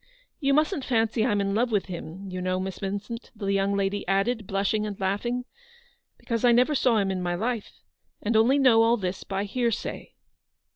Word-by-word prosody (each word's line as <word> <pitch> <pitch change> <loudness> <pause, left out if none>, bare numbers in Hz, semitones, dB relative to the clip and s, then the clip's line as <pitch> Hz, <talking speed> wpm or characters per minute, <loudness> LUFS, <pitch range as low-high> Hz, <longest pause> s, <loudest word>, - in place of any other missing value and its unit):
You 275 -3 +2
musn't 305 0 +1
fancy 225 -2 +1
I'm 210 -4 +1
in 195 0 -1
love 235 +3 +1
with 205 -3 +1
him, 180 +1 -7
you 185 0 -4
know, 185 0 0
Miss 190 -1 -4
Vincent/' 205 +4 -5
the 200 -2 -2
young 195 0 +1
lady 200 +1 -1
added, 200 +3 0
blushing 200 +2 0
and 205 -2 -6
laughing, 240 +6 -1 0.4
" 485 - -38
because 230 -2 -3
I 245 - +6
never 250 +5 +4
saw 255 -4 +3
him 195 -2 +1
in 185 -1 -2
my 175 -1 -1
life, 225 +3 -4 0.4
and 220 +2 -1
I - - +6
only 250 +5 +4
know 255 -5 +5
all 230 +1 +4
this 185 -2 -4
by 195 0 -2
hearsay." 230 +2 -3
210 Hz, 200 wpm, -26 LUFS, 195-240 Hz, 0.4 s, I